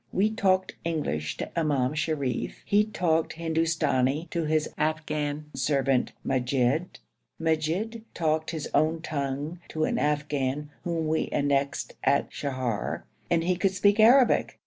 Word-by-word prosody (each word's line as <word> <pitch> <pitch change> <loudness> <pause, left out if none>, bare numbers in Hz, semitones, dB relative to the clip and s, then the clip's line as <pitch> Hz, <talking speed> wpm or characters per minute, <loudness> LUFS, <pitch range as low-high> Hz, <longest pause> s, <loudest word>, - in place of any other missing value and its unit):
We 210 +3 +2
talked 190 -3 +1
English 145 - -2
to - - -3
Imam 140 -4 +1
Sharif, 155 -5 -2
he 205 +1 +3
talked 170 -6 0
Hindustani 160 -3 0
to 170 -2 -1
his 155 0 +1
Afghan 155 -1 -1
servant 135 -1 +1
Majid, 130 +5 0 0.4
Majid 165 +8 -1
talked 160 -1 0
his 160 -4 -4
own 160 +1 +2
tongue 145 +2 -3
to 155 - -1
an - - 0
Afghan 145 -1 -1
whom 165 -2 -1
we 160 +1 +1
annexed 140 -1 0
at 140 +1 +2
Sheher, 130 -6 -3 0.3
and 165 -1 +2
he 180 +1 +1
could 190 +1 0
speak 205 +3 +3
Arabic. 245 +3 +5
155 Hz, 130 wpm, -27 LUFS, 140-170 Hz, 0.4 s, Arabic